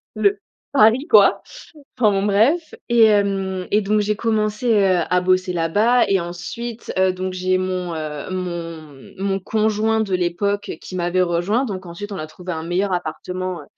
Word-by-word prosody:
le 205 -1 +2 0.3
Paris, 255 +2 +4
quoi! 210 -4 +6 0.6
Enfin, 215 -4 +4
bon, 195 - 0
bref, 240 - +2
et 235 -1 +5
hem, 195 -3 +1
et 210 - +3
donc 210 +2 +1
j'ai 210 0 0
commencé, 220 +1 0
heu, 195 -4 +3
à 180 0 +3
bosser 185 0 +1
là-bas 205 +9 +2
et 195 -2 +2
ensuite, 215 +7 -6
heu, 190 0 +3
donc 185 0 -4
j'ai 185 0 0
mon, 185 -2 -3
heu, 155 -1 -5
mon 165 -6 -6
mon 195 0 -1
conjoint 220 +2 +1
de 200 -4 -1
l'époque 200 +3 -1
qui 185 - -8
m'avait 175 +1 +1
rejoint, 180 +9 0
donc 190 -4 -5
ensuite 180 +5 -8
on - - -4
a 155 - -5
trouvé 180 +4 -8
un 160 -1 -4
meilleur 185 +3 -1
appartement, 180 +1 -4
heu, - - -14
190 Hz, 175 wpm, -20 LUFS, 180-210 Hz, 0.6 s, quoi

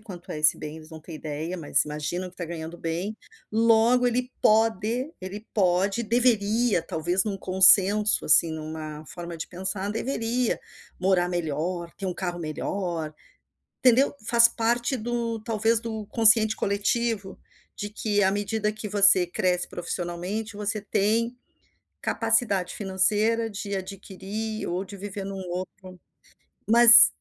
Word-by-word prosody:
quanto 185 -5 -10
é 150 - -5
esse 155 - +4
bem, 150 +1 -8
eles 155 0 -14
não 160 - -9
têm 160 +1 -10
ideia, 155 +4 -5
mas 155 - +1
imaginam 150 +5 -4
que - - -24
está 180 - -6
ganhando 165 0 -7
bem, 175 +6 -3 0.4
logo 230 +2 +4
ele 250 +1 -1
pode, 225 - +1
ele 200 +4 -8
pode, 195 +2 +1
deveria, 230 -2 +2
talvez, 170 +3 -1
em - - 0
um 195 - -4
consenso, 190 +2 +4
assim, 165 +2 +5
em 160 0 -5
uma 155 -1 -7
forma 175 -1 -8
de 160 - -6
pensar, 190 +2 -4
deveria 235 +1 -1 0.4
morar 180 -1 +2
melhor, 170 +1 -3
ter 195 - -4
um 180 - -3
carro 175 -1 -4
melhor, 165 0 -4 0.7
entendeu, 255 +3 +4
faz 235 +1 +6
parte 235 +2 -1
do 235 -1 -3
talvez 225 0 0
do 220 -2 -5
consciente 220 -1 +4
coletivo, 205 0 -1 0.4
de 205 - -5
que 210 -1 0
à 190 - +3
medida 210 +1 -1
que 215 0 -7
você 200 -3 +5
cresce 180 -1 -1
profissionalmente, 180 +5 -5
você 210 +1 -2
tem 220 +4 0 0.7
capacidade 225 -5 0
financeira 210 +4 +1
de 200 0 -5
adquirir 195 +3 -6
ou 180 +2 -2
de 200 +1 -11
viver 200 0 -6
em 195 - -5
um 190 -2 -7
outro 185 0 -7 0.7
mas 235 +1 +10
200 Hz, 145 wpm, -25 LUFS, 180-225 Hz, 0.7 s, mas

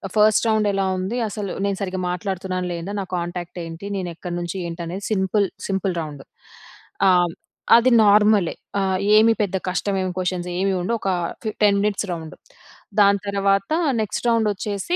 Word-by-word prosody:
First 215 +1 +4
round 215 -1 +2
ఎలా 195 0 0
ఉంది. 195 +6 -3
అసలు 205 -2 -4
నేను 200 -1 -1
సరిగ్గా 185 -1 -3
మాట్లాడుతున్నానా, 185 0 -3
లేదా? 170 +4 -5
నా 190 - -4
కాంటాక్ట్ 175 0 -5
ఏంటి? 165 +4 -8
నేను 180 -2 -3
ఎక్కడి 175 +1 -6
నుంచి 175 +2 -4
ఏంటి? 170 +1 -6
అనేది 190 +4 -5
సింపుల్, 195 +1 +1 0.2
సింపుల్ 190 -1 -1
రౌండ్. 145 -3 -7 0.9
ఆహ్, 175 -2 +4 0.5
అది 245 +2 +3
నార్మలే. 210 -3 +4 0.2
ఆహ్, 190 -1 +1 0.2
ఏమి 225 +1 +6
పెద్ద 190 -1 -2
కష్టమేమి 185 +1 -1
క్వశ్చన్స్ 180 -1 -2
ఏమి 195 0 +1
ఉండవు. 230 +5 -1
ఒక 195 - -1 0.3
ఫి 220 - -1
10 200 -1 +5
మినిట్స్ 210 0 0
రౌండ్. 160 -2 -7 0.6
దాని 200 0 +5
తర్వాత 195 +1 +1 0.3
నెక్స్ట్ 215 +2 -3
రౌండ్ 230 -2 +3
వచ్చేసి 205 - -2
195 Hz, 160 wpm, -22 LUFS, 180-205 Hz, 0.9 s, ఏమి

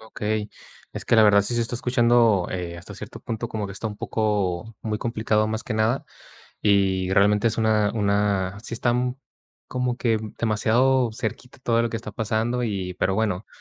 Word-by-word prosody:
Okey. 110 -1 -3 0.4
Es - - -6
que - - +3
la 110 - +7
verdad 100 -1 +6
sí 120 +4 -1
se 120 - +1
está 115 +1 -2
escuchando, 120 -5 +3
eh, 90 -2 -4
hasta 85 - -10
cierto - - -9
punto 115 +1 -4
como 105 -2 -3
que 100 - -7
está 100 +4 -5
un 105 - -8
poco 105 -1 -1
muy 105 -1 -2
complicado, 110 -2 0
más 110 +1 -3
que 110 - -3
nada 110 +4 +1 0.6
y 95 -2 +2
realmente 105 +2 +4
es 115 - +1
una, 110 -2 +2
una 100 -2 +1
sí 115 +1 -6
está, 120 +1 +1
mm, 125 0 0 0.5
como 125 -1 -1
que, 115 -3 +1
mm, 110 -1 -8
demasiado 120 +3 +2
cerquita 125 +3 -5
todo 115 -1 +2
lo 115 - 0
que 115 - -2
está 115 - -7
pasando 115 +2 -1
y 95 -5 -3
pero 95 +1 0
bueno. 105 -2 -1
110 Hz, 195 wpm, -24 LUFS, 100-115 Hz, 0.6 s, la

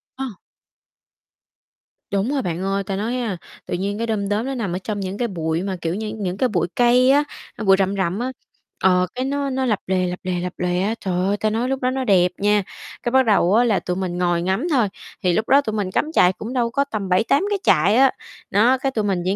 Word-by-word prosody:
Ờ. 265 -3 -5 1.8
Đúng 200 +7 0
rồi 280 - 0
bạn 175 -5 -3
ơi, 195 +1 -1
ta 195 0 -3
nói, 230 +5 -2
a, 220 -7 -2 0.3
tự - - -5
nhiên 200 +3 -2
cái 230 +1 -2
đom 205 -3 -1
đóm 210 +4 0
nó 270 - -3
nằm 205 -8 -3
ở - - -1
trong 210 -2 -3
những 195 +1 -4
cái 240 - 0
bụi 165 -3 -2
mà 195 -1 -2
kiểu 165 +2 -1
như 220 +1 -4
những 185 -2 -3
cái 255 - +1
bụi 175 -4 0
cây 250 +1 +4
á, 290 +2 +4 0.3
a, - - -6
bụi 195 -2 +6
rậm 195 +1 +1
rậm 190 +1 -1
á, 255 +2 -2 0.5
ờ, 180 -1 +4
cái 255 - -2
nó 280 +1 -1
nó 265 0 -1
lập 215 -5 +1
lòe, 185 -1 +1
lập 180 0 -4
lòe, 180 -1 -2
lập 180 0 -4
lòe 180 0 0
á, 215 +4 0
trời 190 - -3
ơi, 205 +1 +1
ta 215 - 0
nói 230 +4 -1
lúc 270 0 -2
đó 250 - +2
nó 260 +1 -2
đẹp 185 -6 +3
nha. 205 0 +2 0.4
Cái 240 - -1
bắt 260 0 +4
đầu 200 -4 +3
á 235 - +5
là 220 -5 +2
tụi 180 - -3
mình 180 -2 -3
ngồi 175 -1 +1
ngắm 190 - 0
thôi, 250 -9 +3 0.4
thì 180 - +3
lúc 220 +6 -1
đó 280 +1 +6
tụi 220 -6 -4
mình 200 -3 -2
cắm 305 +10 0
trại 180 - +4
cũng 225 +6 -7
đâu 240 -2 +1
có 280 - +2
tầm 215 -8 -5
7-8 220 - +3
cái 410 -1 0
trại 180 +6 +4
á, 265 +1 +5 0.4
nó, 235 +6 +4
cái 270 +1 -1
tụi 220 -5 -1
mình 195 -3 0
chỉ 190 +2 +1
205 Hz, 255 wpm, -21 LUFS, 185-250 Hz, 1.8 s, bụi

